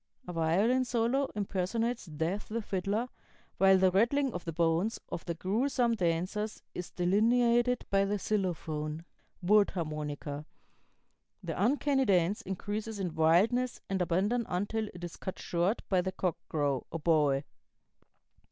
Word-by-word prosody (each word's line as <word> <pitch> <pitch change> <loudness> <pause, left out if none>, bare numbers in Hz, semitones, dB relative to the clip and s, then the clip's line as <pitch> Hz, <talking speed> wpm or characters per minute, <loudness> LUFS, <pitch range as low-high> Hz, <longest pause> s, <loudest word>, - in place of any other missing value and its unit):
A 180 - -5
violin 190 +11 +2
solo 250 +3 +1
impersonates 210 +3 -1
Death 165 +6 -3
the 225 +1 -2
fiddler, 200 +5 -1 0.5
while 195 0 +6
the 185 0 +4
rattling 245 +7 +2
of 175 - -5
the 165 - -2
bones 170 +6 +1
of 165 - -5
the 170 - -3
grewsome 235 - +1
dancers 185 +3 -1
is 180 - -5
delineated 235 +6 +2
by 195 0 +4
the 205 +1 0
xylophone 165 -6 -2 0.4
(wood 205 +2 +5
harmonica). 150 -3 -4 1.0
The - - -3
uncanny 270 +2 +2
dance 185 0 +2
increases 205 +3 -4
in 180 -4 -2
wildness 205 +11 +3
and 190 -1 0
abandon 200 +7 +1
until 205 +4 -1
it 175 -1 -11
is 175 - -6
cut 190 - -5
short 175 +6 -1
by 185 -2 +2
the 190 +1 -2
cock 180 -3 -1
crow 145 -4 -1
(oboe). 150 -4 +2
190 Hz, 135 wpm, -31 LUFS, 170-225 Hz, 1.0 s, while